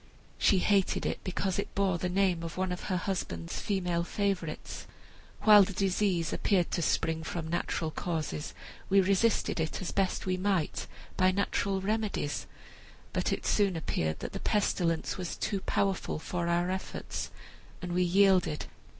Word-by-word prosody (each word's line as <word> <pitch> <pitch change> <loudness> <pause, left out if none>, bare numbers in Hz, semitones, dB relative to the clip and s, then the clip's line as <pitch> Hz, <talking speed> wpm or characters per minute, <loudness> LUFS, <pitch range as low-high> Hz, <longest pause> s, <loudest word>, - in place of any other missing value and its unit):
She 195 - +5
hated 195 +1 +2
it - - -1
because 185 +1 -1
it - - -4
bore 190 -3 +1
the 180 - -1
name 185 -2 +2
of 165 +1 -6
one 185 0 0
of 180 - -4
her 185 - 0
husband's 85 - -3
female 180 -4 0
favorites. 190 -4 -3 0.6
While 210 -1 +9
the 195 0 +1
disease 185 -3 +1
appeared 185 -5 +1
to 170 - 0
spring 160 0 +1
from 165 0 -4
natural 165 -1 -1
causes 155 - -3 0.3
we 195 - +6
resisted 195 +1 +2
it, 160 0 -1
as 185 - -4
we - - -5
best 195 -2 0
might, 185 -2 0 0.3
by 185 -1 +5
natural 195 0 0
remedies; 210 -7 -1 0.7
but - - 0
it - - -2
soon 200 -3 +2
appeared 80 - -2
that - - -5
the 195 - -4
pestilence 180 -6 0
was 180 -2 -4
too 200 -2 -1
powerful 195 -2 0
for 170 +2 -3
our 175 +1 +1
efforts, 190 0 -4 0.5
and 180 -1 -4
we 180 - +2
yielded. 180 -3 +3
185 Hz, 160 wpm, -30 LUFS, 170-195 Hz, 0.7 s, While